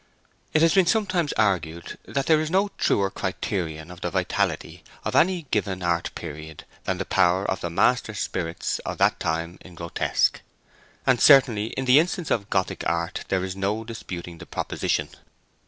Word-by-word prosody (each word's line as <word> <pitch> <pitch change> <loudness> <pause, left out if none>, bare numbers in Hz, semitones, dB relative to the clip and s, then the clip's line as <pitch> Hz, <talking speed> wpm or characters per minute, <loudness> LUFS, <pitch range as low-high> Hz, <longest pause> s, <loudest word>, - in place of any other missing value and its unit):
It 155 - +3
has 165 - +5
been 190 -3 +4
sometimes 185 -7 +1
argued 85 -5 -1
that 140 -1 -1
there 155 -1 +4
is 155 - -2
no 195 +4 +2
truer 100 -1 +2
criterion 90 -5 -3
of 90 +1 -12
the - - -1
vitality - - -1 0.2
of - - -2
any 180 0 +3
given 95 -3 -1
art 85 -1 0
period 80 -1 -8 0.2
than - - -1
the - - -3
power 90 +3 +2
of 95 - -2
the 85 - -2
master 110 +5 +2
spirits 85 -4 -2
of - - -5
that - - +3
time 85 +2 -2
in 90 - -13
grotesque; 85 0 0 0.6
and 125 -2 +3
certainly 125 -7 +6
in 130 - -1
the 130 +3 +7
instance 175 0 -1
of 100 -3 0
Gothic 95 -1 -1
art 85 +3 -2
there 95 -1 0
is 95 0 -4
no 100 +3 -1
disputing 90 -7 -7
the - - -10
proposition. - - -2
95 Hz, 170 wpm, -25 LUFS, 85-135 Hz, 0.6 s, the